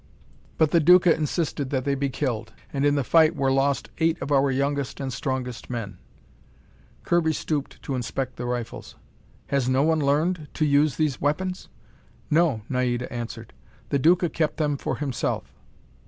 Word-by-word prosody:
But 155 -2 +3
the 170 - +5
Duca 180 +1 +6
insisted 150 -2 -2
that 130 -2 -1
they 140 - +1
be 140 0 -1
killed, 120 -5 -3 0.2
and 140 0 +2
in 145 - +3
the 140 - +1
fight 160 +4 +4
were 135 -2 +1
lost 135 +1 +1
eight 165 +1 +2
of 145 - -5
our 140 0 +4
youngest 140 +1 -1
and 135 -2 -3
strongest 125 -3 -4
men." 105 -6 -5 1.0
Kirby 165 -2 +2
stooped 150 -2 -3
to 140 - -3
inspect 130 +1 -3
the 120 - -5
rifles. 120 -2 -5 0.5
"Has 135 -3 +1
no 130 +2 +3
one 160 0 +2
learned 150 +3 +1
to 155 - +1
use 145 -1 +3
these 155 -4 -1
weapons?" 180 +6 -1 0.6
"No," 150 -9 +2
Naida 125 -1 -1
answered. 115 -2 -6 0.4
"The 140 - +1
Duca 175 +4 +4
kept 155 0 -1
them 150 -2 +1
for - - -3
himself." 140 -4 -3
140 Hz, 165 wpm, -25 LUFS, 130-155 Hz, 1.0 s, Duca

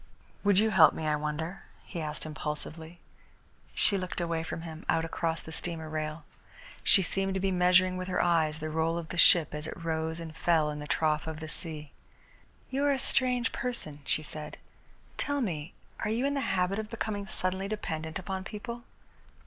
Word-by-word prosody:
"Would 200 -2 +4
you 220 +2 +4
help 170 -6 +7
me, 160 - -3
I 150 -1 +2
wonder?" 150 +5 -3 0.2
he 170 - -5
asked 150 0 -3
impulsively. 155 +2 -4 0.8
She 200 -2 +4
looked 185 -1 -4
away 170 -1 0
from 165 0 -5
him, 160 -1 -7
out 165 0 +3
across 165 0 -1
the 160 - -10
steamer 160 -1 -3
rail. 155 0 -3 0.6
She 195 - +6
seemed 195 +1 -1
to - - +1
be 195 0 +1
measuring 180 0 +4
with 185 0 -4
her 185 - 0
eyes 160 -3 +3
the 155 0 -4
roll 160 +1 +1
of 170 -2 -5
the 180 - -5
ship 170 -3 +7
as 150 +1 -4
it - - -6
rose 160 0 -2
and 160 -1 -7
fell 160 -3 +3
in 150 - -5
the 150 - -6
trough 155 0 +1
of 160 -1 -4
the 160 - -6
sea. 155 -2 -5 0.8
"You 270 +2 0
are 285 - +4
a 275 - +2
strange 250 -2 +1
person," 235 -12 0
she 155 - +1
said. 155 0 -7 0.6
"Tell 285 0 0
me, 170 - -3 0.2
are - - -1
you 235 +5 +1
in 280 - +1
the 280 - 0
habit 190 -2 +1
of 215 -1 -4
becoming 210 -3 -3
suddenly 190 -1 -1
dependent 160 -7 -3
upon 190 0 -4
people?" 235 +4 -6
170 Hz, 195 wpm, -30 LUFS, 155-195 Hz, 0.8 s, help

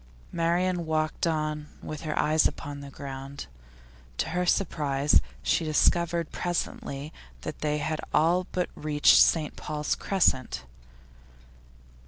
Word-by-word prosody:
Marian 170 +1 0
walked 155 +1 0
on 155 -2 -1 0.2
with 155 - -6
her 155 -2 -3
eyes 155 +1 +4
upon 145 0 -7
the 140 0 -9
ground. 135 0 -7 0.7
To - - -1
her 180 +2 -1
surprise 145 - +2 0.2
she 165 - +2
discovered 170 +1 +2
presently 155 -4 -3 0.3
that - - -6
they 150 0 0
had 155 +1 -2
all 175 +4 +3
but 180 -1 -1
reached 150 -1 +4
St 155 -3 +4
Paul's 150 -1 -2
Crescent. 130 - +1
155 Hz, 120 wpm, -27 LUFS, 145-170 Hz, 0.7 s, eyes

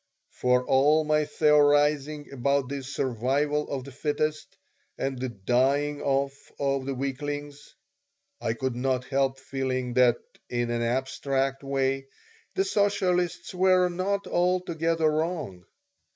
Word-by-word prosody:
For 125 0 +1
all 150 +4 +4
my 150 0 +2
theorizing 150 0 +3
about 140 0 0
the 140 0 -3
"survival 135 +3 -1
of 135 -2 -3
the 140 - -10
fittest" 150 +2 -2 0.4
and 135 -2 -2
the 130 0 -2
"dying 135 +7 +1
off 140 0 -1
of 140 -1 -1
the 135 - -2
weaklings," 145 +2 -5 0.7
I 115 - 0
could 130 +1 -2
not 125 0 -1
help 135 0 0
feeling 130 -2 -3
that, 120 -1 +4 0.3
in 120 -1 -1
an 120 0 -1
abstract 135 +2 -1
way, 135 0 -1 0.5
the 385 - +2
socialists 195 - 0
were 185 0 +4
not 195 +3 -1
altogether 170 -2 +1
wrong. 155 - -2
140 Hz, 125 wpm, -27 LUFS, 130-155 Hz, 0.7 s, all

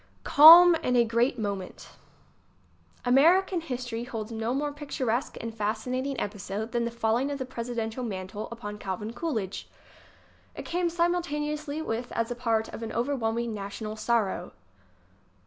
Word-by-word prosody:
Calm 335 +4 +10
In 250 -6 0
a 240 -1 +5
Great 235 +3 +1
Moment 200 -4 -5 1.2
American 335 +8 +4
history 245 -6 -4
holds 225 -3 -6
no 225 +1 -2
more 290 +3 -1
picturesque 275 -4 -3
and 230 0 -5
fascinating 245 +5 -2
episode 205 +2 -4
than 235 0 0
the - - -1
falling 235 +3 0
of 285 - -3
the 260 - -4
presiden 235 -3 -4
tial 250 +3 -6
mantle 190 +1 -5
upon 210 -3 -7
Calvin 210 +4 -5
Coolidge. 225 - -4 0.9
It - - -7
came 350 0 0
simultaneously 310 -3 -1
with 235 -2 -3
and - - -8
as 230 +1 -1
a - - -2
part 230 -2 0
of - - -8
an 225 - -5
overwhelming 235 -2 -1
national 210 +1 -6
sorrow. 215 -5 -1
235 Hz, 145 wpm, -27 LUFS, 220-280 Hz, 1.2 s, Calm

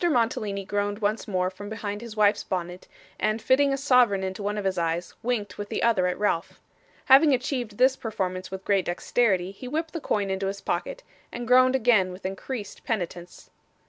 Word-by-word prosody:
Mantalini 225 - 0
groaned 205 +1 -1
once 215 +1 -1
more 185 -2 0
from 205 +2 -9
behind 210 -1 -5
his 230 -2 -9
wife's 205 0 +3
bonnet, 180 -1 -4 0.3
and 215 +1 0
fitting 270 +4 +3
a 275 - 0
sovereign 250 -8 +3
into 190 +1 -4
one 205 +1 -2
of 205 - -3
his 190 -1 +1
eyes, 170 +1 -2
winked 225 -5 -2
with 205 - -5
the - - -2
other 205 -6 +3
at 180 - -2
Ralph. 185 -5 -1 0.5
Having 275 +1 +7
achieved 245 -4 -3
this 260 +1 +4
performance 185 -6 -4
with 190 0 -7
great 195 -3 +2
dexterity, 185 0 +1
he 225 +6 -10
whipped 315 +4 -3
the 330 - -4
coin 200 -6 -1
into 190 0 -1
his 200 +1 -4
pocket, - - -3 0.3
and 240 -1 -6
groaned 255 +1 +5
again 220 -7 +3
with 180 +1 -11
increased 205 +3 -5
penitence. 175 -5 -5
205 Hz, 190 wpm, -26 LUFS, 190-245 Hz, 0.5 s, Having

